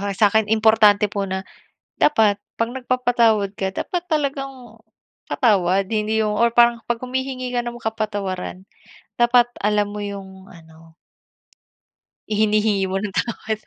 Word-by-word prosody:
sa'kin 205 +2 +2
importante 215 -2 +4
po 200 -1 -2
na 190 0 -3 0.6
dapat 220 -8 +3 0.2
pag 230 +1 -1
nagpapatawad 245 -5 +1
ka 190 0 -2
dapat 355 - -3
talagang 275 -6 -3 0.5
patawad, 195 -5 +2
hindi 220 0 0
yung 210 -1 -1
or 235 +1 +2
parang 235 0 +4
'pag 240 0 -2
humihingi 255 0 -3
ka 245 -1 -1
ng 240 0 -6
kapatawaran 205 -5 -4 0.6
dapat 240 0 +5 0.2
alam 210 0 +2
mo 210 - -5
yung 195 -1 -8
ano 160 -1 -17 1.3
ihinihingi 210 -1 +1
mo 195 - 0
ng 210 -1 -4
tawad. 220 -2 -2
215 Hz, 125 wpm, -21 LUFS, 200-240 Hz, 1.3 s, dapat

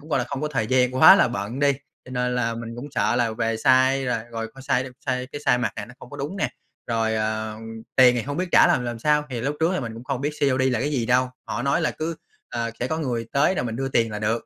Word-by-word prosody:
cũng, 155 - -15
gọi 140 - +2
là, 125 - 0
không 140 +1 -5
có 150 - -1
thời 130 -7 -1
gian, 125 +1 +2
quá 130 - +9
là - - +4
bận 115 +2 -4
đi, 140 0 +4 0.3
cho - - -12
nên 125 0 -1
là 115 -2 0
mình 115 0 -7
cũng 125 - -6
sợ 120 - +1
là 120 -2 +1
về 115 0 -1
size 130 +3 +3
rồi 125 -2 0
rồi 115 -1 -4
coi 135 - -11
size 130 -1 +1
đi - - -6 0.2
size 125 0 -1
cái 145 - -5
size 125 -2 +4
mặc 115 -4 -1
nè 105 - -4
nó 125 - -14
không 125 - -13
có - - -8
đúng 150 +8 -4
nè. 200 - 0 0.4
Rồi, 115 -1 0
ờ, 110 0 -2 0.4
tiền 125 -1 +7
thì 120 - -1
hông 145 +3 -5
biết 185 +1 -1
trả - - +7
làm 125 - +2
làm 120 -1 -4
sao, 150 +3 +2
thì 120 -3 -3
lúc 145 +4 -2
trước 165 +2 +3
thì - - -1
mình 115 -3 -5
cũng 115 +2 -10
không 135 -1 -3
biết 145 - -1
COD 135 -2 +2
là 125 - 0
cái 145 +3 -1
gì 120 -6 -1
đâu. 125 +1 +3 0.2
Họ 120 - -3
nói 140 +4 +1
là 165 - +1
cứ 160 +1 -4 0.3
ờ, 115 -1 -2
sẽ 125 - 0
có 160 +4 -2
người 120 -6 -2
tới 145 +7 +3
rồi 125 - -1
mình 115 -1 -3
đưa 135 0 -2
tiền 115 -4 +1
là 105 - -4
được, 115 +2 -1
125 Hz, 305 wpm, -24 LUFS, 115-140 Hz, 0.4 s, quá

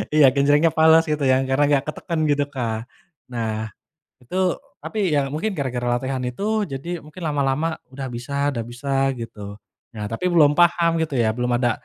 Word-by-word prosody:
Iya 150 - +7
genjrengnya 145 +3 +4
fales 160 +1 +6
gitu 150 -1 -1
ya, - - +5
karena 135 +2 +3
enggak 145 -2 +2
ketekan 165 +2 -3
gitu 145 0 +2
Kak. 120 -4 -2 0.6
Nah 115 -2 -2 0.7
itu 125 +9 -7 0.5
tapi 220 - -5 0.2
ya - - +3
mungkin 160 +9 -1
gara-gara 125 -3 -2
latihan 130 0 -3
itu, 125 +10 -7 0.3
jadi 135 +5 -6 0.2
mungkin 155 +4 -12
lama-lama 140 +1 0 0.3
udah 135 0 -5
bisa 125 +4 -7 0.2
udah 115 -4 -3
bisa 125 +4 -8 0.3
gitu. 110 -2 -8 0.5
Nah, 105 -1 -5
tapi 115 +10 -4
belum 150 -4 +6
paham 170 -1 +4
gitu 160 -3 -2
ya, 110 - +2
belum 125 0 -1
ada 120 -2 +2
140 Hz, 170 wpm, -22 LUFS, 125-155 Hz, 0.7 s, Iya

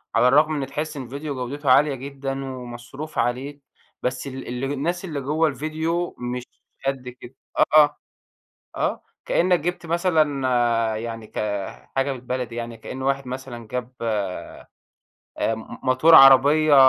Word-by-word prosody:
على 125 - +5
الرغم 155 +4 +4
إن 135 - -3
تحس 150 +2 -4
الفيديو 140 +3 -5
جودته 135 +3 -3
عالية 145 +1 +5
جدًا، 135 0 -5
ومصروف 130 +4 -8
عليه، 135 +4 -1 0.4
بس 130 +2 -2
ال 135 -1 -7
اله 130 +3 -3
الناس 175 +6 -2
اللي 150 -6 -4
جوّا 155 +4 +1
الفيديو 160 +5 -2
مش 125 0 -3 0.4
قد 135 -2 -2
كده. 125 +1 -13 0.4
آه، 150 -1 +6 0.8
آه. - - -1 0.2
كإنّك 180 0 +3
جبت 175 +2 -3
مثلًا 135 - +2
يعني 115 -1 -6
كحاجة 105 +7 -3
بالبلدي 125 -2 -4
يعني، 115 -1 -5
كإن 130 +3 -7
واحد 135 0 0
مثلًا 125 -3 -7
جاب 125 +1 -4 1.4
أمم، 110 0 -3
ماتور 130 +6 +6
عربية 140 +3 +8
135 Hz, 130 wpm, -23 LUFS, 125-150 Hz, 1.4 s, عربية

